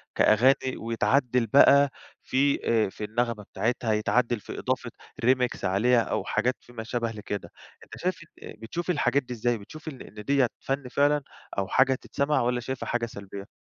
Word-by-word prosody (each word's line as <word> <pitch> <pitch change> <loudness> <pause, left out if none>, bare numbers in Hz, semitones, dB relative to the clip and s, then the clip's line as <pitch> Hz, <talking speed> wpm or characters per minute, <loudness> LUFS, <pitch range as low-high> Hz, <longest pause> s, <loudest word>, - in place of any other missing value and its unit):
كأغاني 130 +4 +3
ويتعدل 120 +1 +1
بقى 140 +3 +6 0.3
في، 140 +2 +2 0.3
آآ، - - -4
في 105 - -9
النغمة 115 0 -1
بتاعتها، 115 +2 -1
يتعدل 115 +3 +1
في - - -8
إضافة - - -2 0.3
Remix 125 -1 +2
عليها 115 +6 +3
أو - - -2
حاجات 125 +1 0
في 120 - -18
ما 115 -2 -5
شابه 115 0 -2
لكده، 105 -2 -6 0.3
أنت - - -12
شايف 185 +1 -2 0.2
إن - - -8
بتشوف 160 +11 -5
الحاجات 145 -4 +2
دي 125 - -7
إزاي؟ 120 0 0
بتشوف 155 +10 -12
إن 135 -4 -10
إن 105 0 -10
ديّة 135 +1 +3
فن 135 -1 -3
فعلًا 145 +3 +2 0.4
أو 95 -1 0
حاجة 135 +7 +3
تتسمع 145 +2 0
والّا 125 +1 0
شايفها 125 +2 -5
حاجة 120 -1 0
سلبيّة؟ 100 -2 -9
120 Hz, 170 wpm, -27 LUFS, 110-135 Hz, 0.4 s, بقى